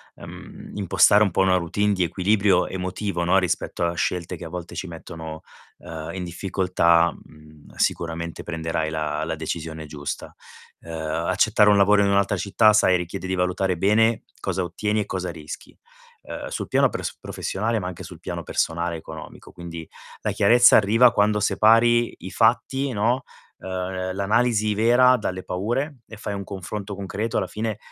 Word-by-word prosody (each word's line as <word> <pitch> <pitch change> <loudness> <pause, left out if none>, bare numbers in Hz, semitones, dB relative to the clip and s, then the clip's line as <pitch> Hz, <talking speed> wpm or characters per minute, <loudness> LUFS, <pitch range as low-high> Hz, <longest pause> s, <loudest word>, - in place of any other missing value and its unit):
ehm, - - -11
impostare 105 +1 +4
un 100 - +1
po' - - -2
una 95 -1 +4
routine 100 +4 0
di 95 -2 +1
equilibrio 95 +2 +2
emotivo, 95 -1 -3
no, 95 +3 +3
rispetto 90 -1 -1
a 85 - 0
scelte 90 +1 -2
che 85 - -10
a 80 - -7
volte 90 -1 -7
ci 95 - -4
mettono, 80 -1 -8 0.3
ehm, 80 -1 -8
in 90 - -4
difficoltà, 85 -2 +2
mhmm, 75 -1 -18
sicuramente 85 0 -2
prenderai 80 -2 -2
la 75 -1 -2
la 80 0 -3
decisione 80 0 -5
giusta. 70 -1 -6 0.5
Ehm, 85 - -10 0.4
accettare 105 - +4
un 105 - +5
lavoro 100 +1 +5
in 100 - +2
un'altra 100 +1 +2
città, 105 +3 +3
sai, 95 -3 +4
richiede 90 +2 -6
di 95 0 -1
valutare 90 0 0
bene 110 +4 +2 0.2
cosa 95 - -1
ottieni 105 +5 -1
e - - -3
cosa 90 -1 -4
rischi, 80 -2 -10 0.5
uhm, - - -7
sul - - -4
piano - - +4
pres - - -5
professionale 110 +3 -2
ma 90 - -4
anche 90 - -7
sul - - -11
piano - - -5
personale 85 +1 -1
e - - -4
economico. 80 -1 -11
Quindi 85 -2 -8 0.3
la - - -1
chiarezza 120 0 +6
arriva 115 +4 +5
quando 105 0 +2
separi 115 +3 +4
i 95 - -8
fatti, 130 +5 +1
no, 120 +5 +1 0.4
ehm, 95 0 -4
l'analisi 110 +1 +1
vera 120 +4 +5
dalle 95 -4 -4
paure 120 +10 -2
e 110 - -10
fai 105 - -5
un 100 0 -4
confronto 100 +1 -6
concreto, 105 +4 -4
alla 95 - 0
fine, 110 +2 -3
95 Hz, 170 wpm, -23 LUFS, 85-105 Hz, 0.5 s, chiarezza